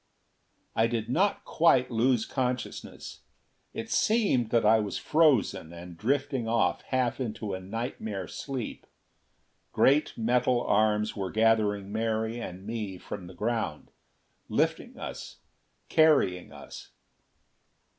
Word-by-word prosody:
I 115 - +3
did 115 -1 -3
not 195 +8 +1
quite 130 -7 +3
lose 120 0 +2
consciousness. 125 -2 -4 0.5
It - - -6
seemed 205 - +2
that 115 -1 +2
I 110 +1 +6
was 105 -2 -3
frozen, 130 - +2
and 85 0 -10
drifting 135 - -1
off 115 -6 +1
half 130 -2 0
into 110 -4 -4
a 95 - -3
nightmare 105 -1 -5
sleep. 135 -5 -6 0.8
Great 145 +3 +3
metal 120 +1 +2
arms 105 0 +2
were 95 -3 -3
gathering 105 -3 +2
Mary 110 +1 -1
and 95 -2 -7
me 105 -4 -4
from 90 0 -8
the 90 - -12
ground. 105 -6 -3 0.6
Lifting - - -1
us; - - -7 0.5
carrying 145 - +3
us.... - - -11
115 Hz, 115 wpm, -28 LUFS, 105-125 Hz, 0.8 s, I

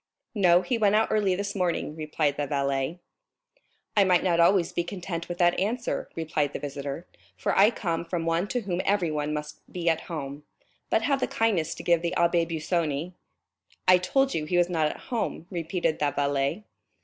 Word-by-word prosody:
"No, 180 -4 +4
he 245 -3 -1
went 210 -1 +4
out 220 - +3
early 200 -4 +2
this 200 +1 -3
morning," 175 -5 -1
replied 155 -2 -1
the 145 0 -2
valet. 140 +2 -1 1.0
"I 205 - +6
might 180 -2 +3
not 175 -2 +2
always 170 0 +4
be 175 - 0
content 175 -2 -5
with 175 - -4
that 175 -1 +3
answer," 230 +5 -2
replied 155 -3 -1
the - - -3
visitor, 140 +3 -5 0.3
"for - - -1
I 200 +2 +7
come 170 -8 -2
from 170 -1 -3
one 165 +3 +1
to 245 +4 -1
whom 185 -3 -2
everyone 155 -7 0
must 150 0 -5
be 175 -2 -4
at 160 - +1
home. 145 -3 -5 0.5
But 220 - +2
have 275 +2 +2
the - - 0
kindness 195 -8 0
to - - -8
give 170 -1 +3
the 170 +1 -2
Abbé 170 -1 +2
Busoni——" 160 0 -1 0.7
"I 185 0 +7
told 270 +9 +1
you 155 - -1
he 175 +3 0
was 175 0 +3
not 160 -3 +2
at - - -4
home," 225 -8 -2
repeated 170 -2 -1
the 145 - +2
valet. 140 +6 -1
170 Hz, 190 wpm, -27 LUFS, 155-190 Hz, 1.0 s, I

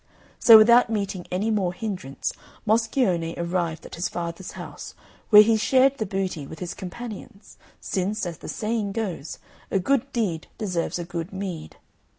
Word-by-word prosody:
So 225 -2 +10
without 235 +2 +6
meeting 200 -4 -3
any 200 +5 0
more 190 -5 0
hindrance, 180 - -4 0.3
Moscione 215 -7 +1
arrived 170 -2 -2
at - - -11
his 170 - -2
father's 170 +1 -5
house, - - -9 0.3
where 210 -1 +10
he 225 +1 +3
shared 265 +4 +3
the 215 - -1
booty 185 -6 -3
with 160 - -9
his 175 +1 -5
companions, 205 +1 -9 0.2
since, 200 +2 -2
as 170 -2 -6
the - - -8
saying 215 -2 -2
goes, 190 -9 -4 0.3
a - - +1
good 275 +7 +1
deed 195 -10 -2
deserves 180 -7 -2
a 175 - -4
good 170 0 -5
meed. 190 -5 -6
195 Hz, 160 wpm, -25 LUFS, 175-220 Hz, 0.3 s, So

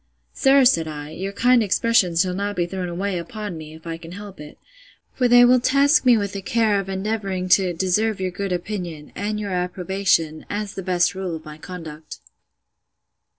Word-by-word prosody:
Sir, 270 -1 +4
said 165 -11 +3
I, 150 -1 -7
your 190 +5 -5
kind 245 +4 +3
expressions 200 -4 +2
shall 185 -1 -3
not 200 +2 -3
be 175 - 0
thrown 180 0 -4
away 185 +1 -2
upon 210 0 -6
me, 155 -1 -9
if 160 - -16
I 165 -1 -4
can 165 +1 -11
help 200 -2 -10
it; 150 0 -11 0.6
for 250 - +1
they 245 0 +7
will 250 +1 +5
task 280 +4 +3
me 245 -2 +6
with 200 -2 -2
the 200 - -5
care 215 0 +1
of 195 -1 -5
endeavouring 195 -1 -2
to 185 -1 +4
deserve 190 +5 0
your 185 -1 -2
good 195 +1 -4
opinion, 175 -4 -5
and 210 +1 -3
your 205 -2 -4
approbation, 180 -3 0
as 205 -1 -4
the 195 - -5
best 180 0 +1
rule 185 -3 -4
of 160 - -10
my 150 0 -10
conduct. 160 -3 -9
190 Hz, 195 wpm, -22 LUFS, 175-210 Hz, 0.6 s, they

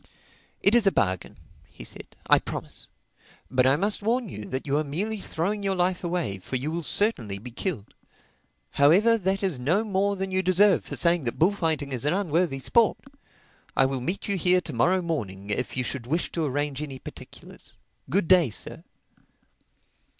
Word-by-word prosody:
"It 200 - +5
is 235 -4 +4
a - - +6
bargain," 95 - -1 0.3
he - - -12
said—"I - - 0
promise. - - -7 0.6
But 130 0 +3
I 135 - +5
must 200 +7 0
warn 230 +1 0
you 105 -8 -7
that 130 +4 -4
you 140 -1 0
are - - 0
merely 200 +10 -3
throwing 195 +4 -2
your 195 -1 0
life 180 0 0
away, 170 - -2
for 110 - -6
you 135 +5 -2
will 170 +1 -2
certainly 140 - -1
be 120 +5 -9
killed. 125 - -4 0.8
However, 185 +11 +5
that 195 +1 -1
is 180 -9 -1
no 170 - +1
more 200 -1 0
than 190 0 -4
you 185 0 +1
deserve 190 +2 +3
for - - -5
saying 170 -4 +2
that 120 - -2
bullfighting 160 -5 +1
is 125 -2 -2
an 150 +3 +1
unworthy 170 -6 0
sport. 225 - +3 0.8
I 135 - +5
will 135 -1 -2
meet 180 +10 -3
you 200 -1 0
here 180 +1 +3
to 170 - -7
morrow 185 0 +2
morning 105 - -4
if 125 +3 -2
you 125 - +2
should 120 -1 -4
wish 165 +6 -1
to 165 -2 -1
arrange 145 +1 -2
any 140 -3 -6
particulars. - - -12 0.4
Good 195 -3 +1
day, 180 -6 +5
Sir." 100 - -5
170 Hz, 180 wpm, -26 LUFS, 130-195 Hz, 0.8 s, a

